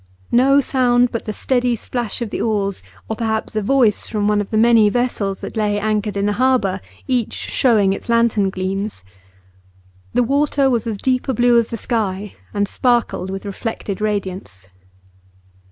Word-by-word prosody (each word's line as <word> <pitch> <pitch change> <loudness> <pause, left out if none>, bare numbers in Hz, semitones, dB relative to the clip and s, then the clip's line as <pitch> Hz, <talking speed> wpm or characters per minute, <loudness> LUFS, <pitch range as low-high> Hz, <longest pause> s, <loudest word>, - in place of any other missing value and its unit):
No 275 +3 +5
sound 245 -2 +2
but 230 - -4
the 215 - -3
steady 245 +2 0
splash 240 0 -4
of 215 - -6
the - - -3
oars, 200 -3 -1 0.3
or 220 - -3
perhaps 220 0 -2
a 215 - +1
voice 230 -1 +2
from 210 -2 -1
one 210 0 +2
of 200 - -6
the 215 - 0
many 225 -1 +5
vessels 210 -4 -1
that - - -7
lay 210 -1 0
anchored 210 -1 -1
in 200 - 0
the 205 - +1
harbour, 255 -8 +2 0.3
each 250 -4 0
showing 210 -6 +2
its 195 - -8
lantern 230 -4 +2
gleams. 190 - -4 1.1
The - - +4
water 275 +1 +2
was 235 -1 0
as 220 -3 -2
deep 255 +4 0
a 265 - 0
blue 240 +1 +4
as 230 - 0
the 230 - -5
sky, 210 -4 -2 0.2
and 205 0 0
sparkled 240 -6 0
with 195 +1 -6
reflected 205 0 -5
radiance. 185 - -4
220 Hz, 170 wpm, -19 LUFS, 200-245 Hz, 1.1 s, No